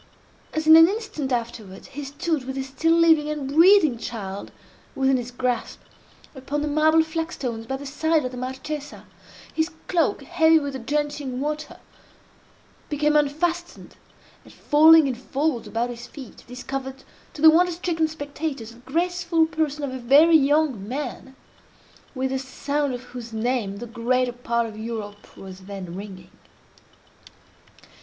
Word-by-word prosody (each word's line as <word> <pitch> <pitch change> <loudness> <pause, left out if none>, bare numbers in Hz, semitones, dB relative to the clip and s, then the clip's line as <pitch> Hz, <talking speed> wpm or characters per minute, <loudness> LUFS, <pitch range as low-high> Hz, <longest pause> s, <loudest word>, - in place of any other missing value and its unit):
As, 315 0 -2
in 315 0 +9
an 325 0 +9
instant 390 -10 -4
afterwards, 230 -5 -4
he 285 +2 -7
stood 285 +1 -2
with 265 0 -5
the 270 - -2
still 320 +5 +1
living 320 -3 +4
and 300 -3 -3
breathing 315 - +5
child 200 -4 -6 0.4
within 270 -1 +2
his 245 -1 -5
grasp, 245 -1 -2 0.5
upon 285 +2 -4
the - - -1
marble 310 +2 +4
flagstones 315 -8 -4
by 265 - -2
the 285 - -9
side 310 +1 0
of 255 - -3
the 250 - -8
Marchesa, 265 +4 -6 0.5
his 320 +1 0 0.2
cloak, 345 -3 +1
heavy 325 -2 +4
with 285 -3 -2
the 265 - -5
drenching 290 0 -2
water, 300 +2 -4 1.1
became 300 0 +1
unfastened, 330 +4 -1 0.5
and, - - -16
falling 315 +1 +6
in 270 - 0
folds 265 +1 -2
about 235 +2 -2
his 240 0 -9
feet, 265 -6 -12
discovered 265 +2 -6 0.3
to 295 - -8
the 320 - +10
wonder 355 +2 +4
stricken 330 -2 -1
spectators 285 -5 -5
the 230 - -16
graceful 335 +4 0
person 305 -2 -2
of 270 -2 -3
a 260 - -5
very 290 +7 +6
young 285 -7 +2
man, 265 +1 -6 0.8
with 260 0 -1
the 265 - -1
sound 280 +2 -2
of 245 - -9
whose 245 -2 -9
name 220 -3 -2
the 240 - -6
greater 245 +2 0
part 235 -1 -1
of 220 -2 -8
Europe 220 -2 -7
was 190 -1 -11
then 190 -3 -7
ringing. 190 -2 -9
275 Hz, 150 wpm, -24 LUFS, 245-315 Hz, 1.1 s, the